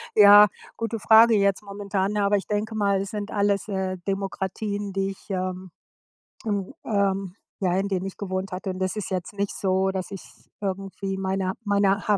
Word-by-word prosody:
Ja, 205 0 +9 0.3
gute 225 0 -3
Frage 225 +2 +7
jetzt 200 -1 +2
momentan, 200 0 -2
aber 205 0 +3
ich 195 - -5
denke 215 +1 -2
mal, 200 -2 +2
es 195 - -5
sind 210 -1 -4
alles, 200 -1 +1
äh, 190 -2 -2
Demokratien, 195 +1 -3
die 195 0 -1
ich, 195 - -15
ähm 185 -1 -3 0.7
hm, 205 -3 -2
ähm 195 -3 0 0.3
ja, 180 - +2
in 195 +1 0
denen 190 -1 -1
ich 195 - -9
gewohnt 190 -1 -3
hatte 185 +1 -3
und 185 - -6
das 185 +1 -1
ist 210 -3 -4
jetzt 185 +1 -3
nicht 200 0 -2
so, 190 0 +1
dass 190 -1 -4
ich 195 -2 -7
es - - -20
irgendwie 195 0 -3
meiner 190 0 -1
meiner 200 -1 +2
ha 210 -1 +4
195 Hz, 185 wpm, -25 LUFS, 190-205 Hz, 0.7 s, Ja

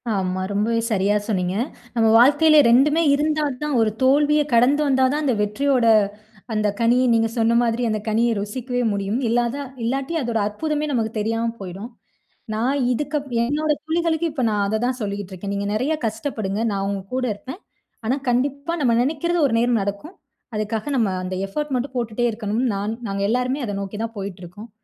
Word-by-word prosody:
ஆமா. 185 -1 -1
ரொம்பவே 215 +3 +1
சரியா 205 0 +2
சொன்னீங்க. 185 -4 -1 0.4
நம்ம 225 -1 +3
வாழ்க்கையில 295 +5 +6
2மே 290 +7 +4
இருந்தா 305 +1 +1 0.2
தான் 300 -2 -1
ஒரு 220 -1 +2
தோல்விய 295 +3 +4
கடந்து 250 +6 +4
வந்தா 265 -1 +3
தான், 300 +1 -1
அந்த 260 - +2
வெற்றியோட 250 +4 +1 0.7
அந்த 215 -1 +1
கனியை, 240 +2 +3
நீங்க 225 0 +3
சொன்ன 230 +1 +3
மாதிரி 230 0 0
அந்த 215 -1 -1
கனிய 225 +2 +2
ருசிக்கவே 245 +5 -3
முடியும். 200 +4 -1
இல்லாதா 240 +4 0 0.2
இல்லாட்டி 270 +6 -2
அதோட 235 -3 -1
அற்புதமே 300 +8 -2
நமக்கு 225 -4 0
தெரியாம 225 +2 -1
போயிடும். 195 +4 -7 0.6
நான் 250 +6 0
இதுக்கப் 290 +2 -2 0.2
என்னோட 300 +5 0
தோழிகளுக்கு 330 0 0
இப்ப 280 -4 -2
நான் 205 -1 0
அத 220 +2 0
தான் 250 0 -1
சொல்லிகிட்டுருக்கேன். 200 -1 -4
நீங்க 200 0 -2
நெறைய 255 +9 0
கஷ்டப்படுங்க, 220 -2 -3
நான் 195 -1 -2
உங்க 200 -1 -3
கூட 255 0 0
இருப்பேன். 260 - -9 0.5
ஆனா, 245 +4 +1
கண்டிப்பா 280 +6 0
நம்ம 245 -4 +3
நெனைக்கிறது 320 +6 0
ஒரு 240 - -3
நேரம் 240 -1 +2
நடக்கும். 200 - -5 0.4
அதுக்காக 215 +5 -2
நம்ம 225 -5 +2
அந்த 185 0 -4
எஃபோர்ட் 295 +8 -3
மட்டும் 255 +2 -3
போட்டுட்டே 235 0 -1
இருக்கணும்னு 220 +3 -1
நான் 205 +2 -2 0.2
நாங்க 195 0 -3
எல்லாருமே 250 +4 0
அத 205 -3 -4
நோக்கி 200 +1 -6
தான் 230 0 -5
போயிட்டுருக்கோம். 195 +2 -8
235 Hz, 165 wpm, -22 LUFS, 210-280 Hz, 0.7 s, வாழ்க்கையில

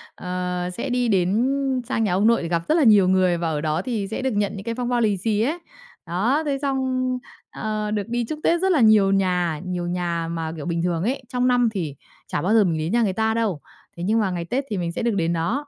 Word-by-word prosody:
ờ, 180 0 -3
sẽ 255 +3 -3
đi 245 -1 +1
đến 200 +4 +2 0.4
sang 225 -4 0
nhà 195 - +1
ông 200 +4 +3
nội 230 0 +3
để - - -3
gặp 170 0 0
rất 310 - +4
là 320 - +4
nhiều 210 -6 +6
người 185 -2 +3
và 170 -1 -1
ở 150 -2 -2
đó 155 0 0
thì 225 -6 -3
sẽ 220 +5 -4
được 265 - 0
nhận 205 -2 0
những 195 - -7
cái 230 +1 -3
phong 245 0 -2
bao 245 -1 +1
lì 210 -4 +2
xì 210 +2 0
ấy. 300 +9 0 0.5
Đó, 220 - 0
thế 280 -2 0
xong, 260 -2 0 0.4
ờ, 215 -1 -3
được 210 -1 -2
đi 240 0 -1
chúc 305 - -4
Tết 340 +1 +2
rất 380 0 +2
là 315 -7 +3
nhiều 215 -3 +5
nhà, 180 -5 +1
nhiều 180 -1 -3
nhà 175 -2 -2
mà, 165 -1 -3
kiểu, 150 -3 -7
bình 170 -1 -1
thường 175 -1 0
ấy, 260 +4 -1
trong 250 -1 0
năm 245 -2 +3
thì 160 -8 -3 0.3
chả - - -2
bao 190 +7 +1
giờ 225 -2 +6
mình 170 -4 0
đến 155 +3 -2
nhà 235 +2 +3
người 195 -4 0
ta 220 +2 +1
đâu, 215 -9 -1 0.4
thế 170 - -5
nhưng 215 +5 +2
mà 200 -4 0
ngày 175 -1 -3
Tết 255 +11 -1
thì 205 - -2
mình 170 -2 -2
sẽ - - -4
được 235 -3 +1
đến 170 -3 0
đó. 230 - -1
205 Hz, 270 wpm, -23 LUFS, 175-240 Hz, 0.5 s, nhiều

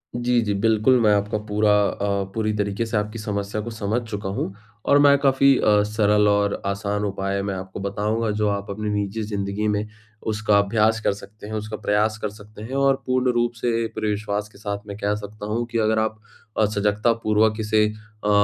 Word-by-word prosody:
जी, 120 0 +2
जी, 105 -2 -1
बिल्कुल 110 +5 +3
मैं 105 -2 +5
आपका 105 +1 0
पूरा 105 0 +2 0.2
अ, 100 0 -1
पूरी 110 -1 0
तरीके 100 +2 -1
से 115 -1 -1
आपकी 105 +2 -3
समस्या 105 0 -3
को 115 - -6
समझ 110 +2 -1
चुका 100 -3 -4
हूँ 95 0 -3 0.3
और 145 - +5
मैं 140 0 +6
काफ़ी 135 0 +4
अ, 105 -1 +4
सरल 105 0 +2
और 100 0 +1
आसान 100 +1 -1
उपाय 100 0 -2
मैं 100 -1 -2
आपको 95 +1 -7
बताऊँगा। 105 +3 -1
जो 105 0 0
आप 100 0 -3
अपनी 105 +1 -3
निजी 105 +1 -2
ज़िंदगी 100 0 -2
में 105 0 0 0.4
उसका 110 -1 +2
अभ्यास 110 +2 +2
कर 100 - +1
सकते 105 +1 -12
हैं, 110 - -6
उसका 110 0 -4
प्रयास 105 +1 +1
कर 105 - -1
सकते 105 0 -13
हैं 125 +5 -5
और 135 0 +2
पूर्ण 130 0 +2
रूप 120 0 +1
से 115 0 0
पूरे 110 -1 -1
विश्वास 105 0 -2
के - - -18
साथ 100 0 -5
मैं 100 -1 -6
कह 105 0 0
सकता 105 0 -8
हूँ 115 +3 -1
कि 115 - -1
अगर 110 0 +2
आप 110 0 -1 0.4
अ, 110 - +4
सजगतापूर्वक 105 +1 +1
इसे 110 0 +3
अ, 105 0 -7
105 Hz, 200 wpm, -23 LUFS, 100-110 Hz, 0.4 s, मैं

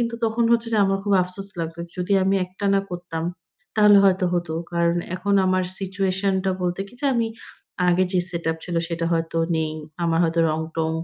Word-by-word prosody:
কিন্তু 235 0 -1
তখন 225 +1 +1
হচ্ছে 230 0 +2
যে - - +3
আমার 195 0 +1
খুব 205 - 0
আফসোস 195 +2 -6
লাগলো 165 +1 -5
যে - - -22
যদি 180 +3 -1
আমি 195 +1 +2
একটানা 195 +2 0
করতাম 175 -2 -5 0.5
তাহলে 210 -1 +7
হয়তো 190 -1 +3
হতো। 175 -2 -1 0.2
কারণ 170 0 +2 0.2
এখন 200 +2 0
আমার 185 0 +2 0.2
সিচুয়েশন 190 0 0
টা 190 - +2
বলতে 180 +1 -1
কি - - -16
যে 285 - 0
আমি 230 -1 +1 0.6
আগের 180 +1 +3
যে 180 - +3
সেটআপ 165 -2 -2
ছিল 175 -1 -3
সেটা 170 -1 -2
হয়তো 165 0 -1 0.2
নেই। 155 -1 -1 0.3
আমার 165 -1 +2
হয়তো 165 +1 +1
রং-টং 160 +1 -2
180 Hz, 190 wpm, -23 LUFS, 165-195 Hz, 0.6 s, তাহলে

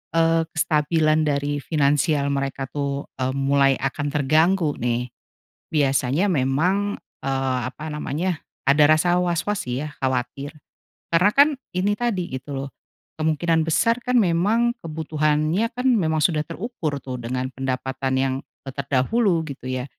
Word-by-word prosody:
eee, 165 0 +3
kestabilan 155 0 +2
dari 145 0 0
finansial 145 -1 +1
mereka 135 -1 -2
tuh 140 -1 -3
e 130 - 0
mulai 140 0 +3
akan 135 +2 -2
terganggu 155 +3 +2
nih. 120 +1 -1 0.6
Biasanya 140 +4 +2
memang, 180 +7 +1 0.2
eee, 135 -1 0
apa 155 +2 -8
namanya, 155 +3 -2 0.3
ada 145 +2 +5
rasa 175 +3 +3
was-was 180 +3 -1
sih 125 +3 -3
ya, - - -9
khawatir. 130 +2 -2 0.6
Karena 180 +5 +5
kan 285 +2 +6 0.3
ini 200 +3 +2
tadi 205 -6 -1
gitu 130 +3 -9
loh, 135 +1 -4 0.5
kemungkinan 160 +1 +2
besar 230 +9 +1
kan 250 -1 +2
memang 215 +6 +2
kebutuhannya 155 +5 0
kan 250 +2 -4
memang 165 -11 +2
sudah 155 -4 +2
terukur 165 - -4
tuh, 130 -1 -6
dengan 125 +2 -3
pendapatan 130 +1 -3
yang, 135 -1 +1 0.3
eee, 135 - -6
terdahulu 165 - +1
gitu 130 -2 -7
ya. 130 -1 -2
150 Hz, 135 wpm, -23 LUFS, 135-175 Hz, 0.6 s, kan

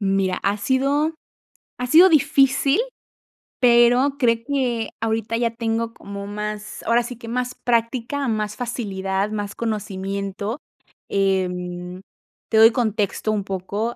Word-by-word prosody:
Mira, 195 -2 +1
ha 200 +1 +1
sido 275 +7 +1 0.7
ha 250 - -1
sido 335 +8 +7
difícil, 280 - +3 0.8
pero 245 +3 +5
creo 235 -4 +3
que 250 -5 -1
ahorita 225 0 -1
ya 235 -1 +1
tengo 230 0 -2
como 200 -2 -8
más 210 0 -5
ahora 235 +1 +2
sí 240 0 -7
que 230 - -11
más 250 +1 -2
práctica, 245 +3 0
más 210 -1 -2
facilidad, 200 -4 -2
más 205 -2 -3
conocimiento, 200 +1 -3 0.5
em, 180 -2 -1 0.5
te 220 - +2
doy 225 +1 +8
contexto 220 -3 -1
un 205 -2 -1
poco, 200 +5 -3
225 Hz, 125 wpm, -22 LUFS, 200-245 Hz, 0.8 s, doy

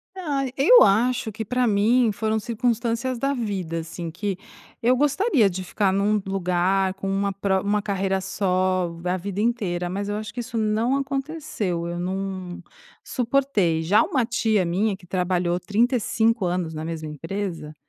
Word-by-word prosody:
Ah, 295 -7 -1
eu 410 - +7
acho 235 +3 +2
que 220 +2 -5
pra 250 +4 0
mim 225 +2 +3
foram 220 +2 -1
circunstâncias 235 +2 -1
da 275 +3 0
vida, 195 -9 -3
assim, 165 0 -6
que 195 +1 -3 0.4
eu 245 +2 +4
gostaria 290 - +3
de 185 +1 -5
ficar 195 +1 0
num 205 +2 +1
lugar 190 0 +1
com 195 0 -5
uma 195 0 0
pro 190 -1 0
uma 205 0 +1
carreira 195 -1 -1
só 185 -2 0
a 180 +1 +1
vida 200 +2 -4
inteira, 195 -7 -1
mas 200 +3 -3
eu 205 - -1
acho 215 0 -5
que 245 - -7
isso 230 0 -8
não 220 +4 +1
aconteceu, 270 - -3
eu 175 0 -4
não 185 -1 -4 0.4
suportei. 230 -10 +1
Já 205 +8 +4
uma 260 -4 0
tia 225 -3 +1
minha 195 +5 0
que 190 -2 -18
trabalhou 180 -1 0
35 225 +1 +1
anos 175 -2 -2
na 155 +1 -4
mesma 160 -2 -5
empresa, 165 0 -5
200 Hz, 160 wpm, -24 LUFS, 185-235 Hz, 0.4 s, eu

